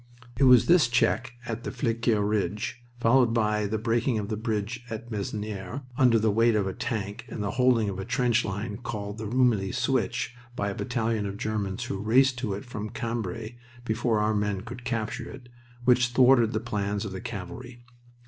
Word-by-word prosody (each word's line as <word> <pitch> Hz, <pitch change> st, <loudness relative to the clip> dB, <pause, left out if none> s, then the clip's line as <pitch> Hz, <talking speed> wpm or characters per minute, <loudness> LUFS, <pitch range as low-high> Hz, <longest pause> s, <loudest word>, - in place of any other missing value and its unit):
It 135 Hz, -, +3 dB
was 125 Hz, -2 st, +7 dB
this 170 Hz, -5 st, +5 dB
check 120 Hz, +1 st, +1 dB
at 115 Hz, 0 st, -4 dB
the -, -, -3 dB
Flesquieres 115 Hz, -4 st, 0 dB
Ridge, 105 Hz, +2 st, -2 dB, 0.2 s
followed 120 Hz, 0 st, +4 dB
by 105 Hz, -2 st, +1 dB
the 110 Hz, +2 st, -1 dB
breaking 115 Hz, +2 st, +1 dB
of 105 Hz, 0 st, -3 dB
a -, -, 0 dB
bridge 110 Hz, +1 st, -3 dB
at 115 Hz, +1 st, -6 dB
Masnieres 105 Hz, +1 st, -4 dB
under 125 Hz, -2 st, +5 dB
the 110 Hz, -1 st, +2 dB
weight 115 Hz, +2 st, +3 dB
of 105 Hz, -2 st, +2 dB
a 95 Hz, -, -2 dB
tank 105 Hz, +2 st, -4 dB
and 105 Hz, -, -4 dB
the 100 Hz, -, -1 dB
holding 125 Hz, -3 st, +3 dB
of 95 Hz, -1 st, -3 dB
a -, -, -3 dB
trench 120 Hz, +1 st, +1 dB
line 105 Hz, +2 st, -4 dB
called 105 Hz, -3 st, -5 dB
the 110 Hz, -, -4 dB
Rumilly 115 Hz, -5 st, +2 dB
switch 125 Hz, -3 st, 0 dB, 0.2 s
by 100 Hz, -2 st, -1 dB
a -, -, -4 dB
battalion 115 Hz, -3 st, -1 dB
of 100 Hz, 0 st, -5 dB
Germans 105 Hz, -3 st, -2 dB
who 95 Hz, -, -4 dB
raced 125 Hz, +4 st, +3 dB
to 110 Hz, -6 st, -2 dB
it 100 Hz, -, -7 dB
from 110 Hz, -3 st, -5 dB
Cambrai 115 Hz, 0 st, -4 dB, 0.3 s
before 115 Hz, 0 st, +1 dB
our 105 Hz, +1 st, +2 dB
men 105 Hz, -2 st, 0 dB
could 120 Hz, +3 st, -9 dB
capture 115 Hz, +1 st, -3 dB
it, 125 Hz, -3 st, -11 dB, 0.4 s
which 125 Hz, -1 st, +5 dB
thwarted 120 Hz, -2 st, +5 dB
the 110 Hz, -, +1 dB
plans 105 Hz, -2 st, -2 dB
of 100 Hz, -, -5 dB
the 95 Hz, -, -6 dB
cavalry. 120 Hz, +2 st, -7 dB
110 Hz, 190 wpm, -27 LUFS, 105-120 Hz, 0.4 s, was